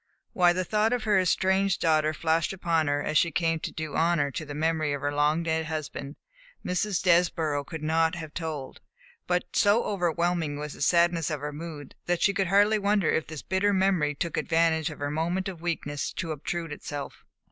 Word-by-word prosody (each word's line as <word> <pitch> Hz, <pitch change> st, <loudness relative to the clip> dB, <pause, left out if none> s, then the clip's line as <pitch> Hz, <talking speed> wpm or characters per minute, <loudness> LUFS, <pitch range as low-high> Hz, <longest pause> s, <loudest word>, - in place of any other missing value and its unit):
Why 175 Hz, -1 st, +5 dB
the 185 Hz, +1 st, -1 dB
thought 215 Hz, +4 st, +1 dB
of 245 Hz, -3 st, -1 dB
her 210 Hz, -3 st, +3 dB
estranged 190 Hz, +2 st, +2 dB
daughter 155 Hz, -1 st, +2 dB
flashed 160 Hz, +3 st, 0 dB
upon 170 Hz, -4 st, 0 dB
her 145 Hz, 0 st, 0 dB
as 155 Hz, -, +2 dB
she 170 Hz, -, +2 dB
came 165 Hz, 0 st, 0 dB
to -, -, -5 dB
do 160 Hz, -3 st, -5 dB
honor 160 Hz, -3 st, +2 dB
to 155 Hz, -, -5 dB
the 145 Hz, -, -6 dB
memory 155 Hz, -1 st, 0 dB
of 140 Hz, -, -4 dB
her 145 Hz, +1 st, -1 dB
long 150 Hz, +3 st, +2 dB
dead 160 Hz, -1 st, -1 dB
husband, 155 Hz, -2 st, -5 dB, 0.5 s
Mrs. 180 Hz, +1 st, -1 dB
Desborough 165 Hz, -5 st, +2 dB
could 155 Hz, +2 st, -8 dB
not 160 Hz, +1 st, +2 dB
have 160 Hz, -3 st, -7 dB
told, 155 Hz, -5 st, -5 dB, 0.5 s
but 180 Hz, 0 st, +1 dB
so 205 Hz, +3 st, +4 dB
overwhelming 170 Hz, -5 st, -1 dB
was 150 Hz, 0 st, -5 dB
the -, -, -12 dB
sadness 170 Hz, +1 st, +3 dB
of 150 Hz, -3 st, -3 dB
her 150 Hz, 0 st, -4 dB
mood 150 Hz, -2 st, -8 dB
that 175 Hz, -1 st, +1 dB
she 200 Hz, -, +4 dB
could 195 Hz, -2 st, 0 dB
hardly 205 Hz, +3 st, +4 dB
wonder 200 Hz, -4 st, +2 dB
if 160 Hz, -, 0 dB
this 155 Hz, -2 st, -7 dB
bitter 200 Hz, +2 st, +1 dB
memory 185 Hz, -6 st, +2 dB
took 170 Hz, +3 st, -3 dB
advantage 160 Hz, -1 st, +2 dB
of 150 Hz, -, -9 dB
her 145 Hz, 0 st, -3 dB
moment 170 Hz, +5 st, -1 dB
of 180 Hz, -4 st, -7 dB
weakness 150 Hz, -4 st, -3 dB
to 170 Hz, -3 st, -4 dB
obtrude 165 Hz, +2 st, -4 dB
itself. 145 Hz, -1 st, -7 dB
165 Hz, 200 wpm, -27 LUFS, 150-180 Hz, 0.5 s, Why